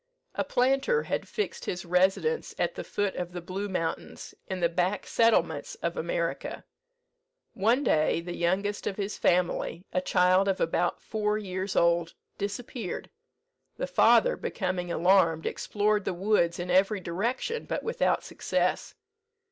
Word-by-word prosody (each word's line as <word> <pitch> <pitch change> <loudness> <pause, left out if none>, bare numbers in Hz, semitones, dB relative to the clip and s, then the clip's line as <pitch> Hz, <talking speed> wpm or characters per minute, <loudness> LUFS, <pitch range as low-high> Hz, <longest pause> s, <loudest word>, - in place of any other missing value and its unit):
A - - -1
planter 270 - +2
had - - -3
fixed 425 - -3
his 180 0 -4
residence 190 - +1
at - - 0
the - - -6
foot 205 -1 -2
of 175 0 -4
the 180 - -4
Blue 190 +4 -4
Mountains, 165 -3 -4
in 190 -1 -3
the 170 - +3
back 180 +3 -1
settlements 170 -10 +2
of 170 0 -1
America. 170 0 -3 0.9
One 230 +8 +2
day 155 - +2
the 175 +1 -6
youngest 195 +4 0
of 195 - -3
his 205 0 -3
family, 180 0 +1
a 185 - +1
child 185 +2 +3
of 195 -1 +1
about 175 +1 0
four 210 -1 -1
years 190 -1 -4
old, 170 -1 +2 0.2
disappeared. 205 +1 -5 0.7
The - - -1
father, - - +4
becoming 180 -3 -3
alarmed, 170 -2 +3
explored 210 0 0
the 185 - -1
woods 175 -3 +2
in 180 0 -3
every 195 +3 +3
direction, 230 - -2
but - - -3
without 465 - +1
success. - - -1
185 Hz, 145 wpm, -28 LUFS, 175-210 Hz, 0.9 s, father